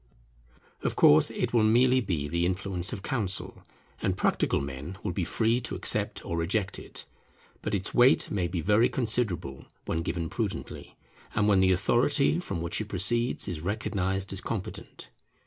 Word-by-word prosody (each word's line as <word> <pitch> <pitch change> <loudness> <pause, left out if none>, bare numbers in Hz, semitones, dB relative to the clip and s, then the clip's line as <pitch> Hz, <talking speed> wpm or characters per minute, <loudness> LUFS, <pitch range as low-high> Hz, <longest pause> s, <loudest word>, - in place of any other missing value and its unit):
Of - - -1
course 75 0 +6
it - - -3
will 115 - +4
merely 125 +4 +4
be 85 - -2
the 85 +3 -1
influence 90 0 -2
of 95 - -6
counsel, 105 -9 -3 0.4
and - - -1
practical - - +1
men 70 +6 -6
will - - -2
be 90 +1 -2
free 115 +8 +1
to 120 - -4
accept - - +1
or 85 - -3
reject 95 +4 -1
it; - - -9 0.6
but - - -2
its 95 -2 -2
weight 125 +2 +4
may 90 -4 0
be 85 -1 -3
very 105 +7 +3
considerable 110 - -1 0.2
when 80 - -2
given 85 0 -3
prudently, - - -5 0.4
and 105 - +2
when 100 -2 +4
the 95 0 +4
authority 140 - +2
from 130 - -4
which 85 +5 -1
it 110 - -5
proceeds 115 +7 +2
is 85 -5 -4
recognized 95 0 -2
as 95 - -4
competent. 105 -5 -7
95 Hz, 165 wpm, -28 LUFS, 85-115 Hz, 0.6 s, course